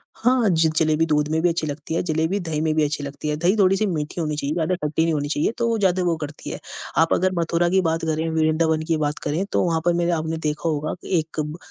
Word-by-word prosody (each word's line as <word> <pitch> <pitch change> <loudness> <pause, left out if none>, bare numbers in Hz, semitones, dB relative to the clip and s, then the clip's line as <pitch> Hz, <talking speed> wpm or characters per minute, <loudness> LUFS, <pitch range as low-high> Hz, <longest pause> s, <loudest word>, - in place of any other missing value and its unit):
हाँ, 245 -3 +2
ज 165 -2 +3
जलेबी 155 0 +3
दूध 150 -2 +1
में 160 0 +1
भी 175 - +3
अच्छी 165 -2 -1
लगती 150 +2 -5
है, - - +1
जलेबी 160 +3 0
दही 160 -4 -3
में 155 -1 +1
भी 155 - +3
अच्छी 145 0 -1
लगती 140 +2 -6
है, 150 - 0
दही 175 +5 +2
थोड़ी-सी 195 +1 +3
मीठी 165 -2 -3
होनी 150 -1 -1
चाहिए, 145 0 -1
ज़्यादा 165 +2 0
खट्टी 155 -1 -1
नहीं 165 0 +1
होनी 145 -1 -1
चाहिए, 150 +6 +1
तो 235 - +1
वो 230 - +1
ज़्यादा 185 -2 +2
वो 175 -2 +1
करती 150 +1 -7
है। - - -5 0.4
आप 165 0 +4
अगर 185 +1 +2
मथुरा 170 +1 +1
की 190 +1 +3
बात 165 -2 0
करें, 160 0 -1
वृदावन 160 0 +1
की 165 -1 +1
बात 150 0 -1
करें, 160 +7 -1
तो - - +2
वहाँ 165 -2 +1
पर 175 - +4
मेरे 175 0 +1
आपने 160 0 -1
देखा 155 +1 -2
होगा 155 0 -2
कि 180 -4 +1
एक 160 0 -6
ब 150 +2 -3
160 Hz, 265 wpm, -23 LUFS, 155-175 Hz, 0.4 s, आप